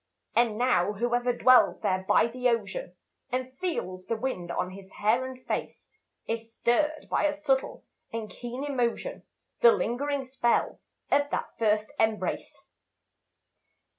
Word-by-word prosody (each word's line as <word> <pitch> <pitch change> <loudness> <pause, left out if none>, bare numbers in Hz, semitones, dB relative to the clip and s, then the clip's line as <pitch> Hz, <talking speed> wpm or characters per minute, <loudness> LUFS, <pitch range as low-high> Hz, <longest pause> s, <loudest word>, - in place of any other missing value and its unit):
And 230 -3 +3
now 225 -6 +2
whoever 240 +3 +1
dwells 255 +1 +5
there 190 -3 0
by - - +5
the 250 +2 0
ocean, 245 - -2 0.4
And 255 +1 -3
feels 185 - -3
the 230 - 0
wind 220 -8 -3
on 180 +1 -2
his 190 0 -11
hair 220 +5 +2
and 260 -1 -9
face, - - -4 0.4
Is 225 0 -3
stirred 300 +7 +1
by - - +1
a 300 - +3
subtle 290 -3 -1 0.3
and 225 -1 -4
keen 245 +4 -6
emotion, 270 - -1 0.4
The 475 -1 +8
lingering 280 - -1
spell 255 -2 0 0.3
of 285 0 +3
that - - -3
first 215 -1 +2
embrace. 220 -1 -1
240 Hz, 135 wpm, -28 LUFS, 220-265 Hz, 0.4 s, The